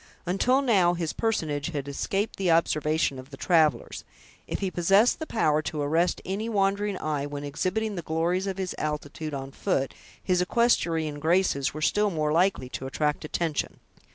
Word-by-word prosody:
Until 250 +10 +2
now 190 -8 +3
this 170 -2 -2
personage 155 -11 -1
had 145 -5 -4
escaped 195 +9 -2
the 190 -2 0
observation 155 -3 +2
of 130 +1 -11
the 135 - -10
travelers. 155 -8 +2 0.4
If - - -2
he 190 -2 -2
possessed 195 - +3
the 315 - -5
power 155 -9 +2
to 155 0 -4
arrest 165 +5 +1
any 205 +4 -3
wandering 200 -1 +1
eye 150 -3 -2
when 145 0 -6
exhibiting 185 +9 -2
the 175 - -3
glories 170 +4 0
of 195 -1 -3
his 190 -2 -3
altitude 150 0 -4
on 135 0 -6
foot, 135 0 -1 0.3
his 180 -1 +2
equestrian 165 -8 +1
graces 160 -4 +1
were 155 - -4
still 210 +5 +2
more 155 -4 -1
likely 175 -4 +2
to 130 - -5
attract 150 +2 -1
attention. 160 0 -2
165 Hz, 170 wpm, -27 LUFS, 150-195 Hz, 0.4 s, now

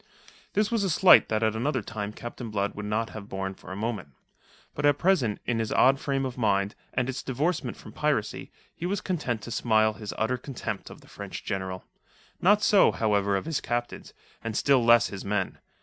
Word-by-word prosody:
This 210 +1 +1
was 230 -3 +1
a 195 - +1
slight 180 +3 +7
that 110 0 0
at 110 0 +1
another 130 +1 -1
time 105 0 -5
Captain 120 +1 -7
Blood 100 -1 -1
would 105 0 -6
not 110 +2 -1
have 105 -1 -9
borne 95 0 -3
for 95 - -12
a - - -4
moment. 110 -5 -3 0.7
But - - -5
at 145 -1 +4
present, 155 - +2
in 120 -2 0
his 110 -1 -2
odd 135 +1 +4
frame 135 -1 -1
of 130 -1 -5
mind, 100 -2 +1 0.2
and 125 0 +1
its 130 0 -3
divorcement 145 +7 -1
from - - -12
piracy, - - -1 0.2
he 175 - -4
was 200 +1 -1
content 140 - -2
to 120 - -7
smile 110 -2 +2
his 105 -1 -7
utter 110 +3 0
contempt 120 -5 -5
of - - -12
the - - -19
French - - -8
General. 95 -1 -4 0.6
Not 205 +3 +4
so, 205 - +6
however, 100 -3 +1
his 160 -3 -2
captains, 120 0 -3 0.3
and 115 -2 -3
still 135 -4 +4
less 120 0 +5
his 100 - -7
men. 105 +1 -2
115 Hz, 200 wpm, -27 LUFS, 105-135 Hz, 0.7 s, slight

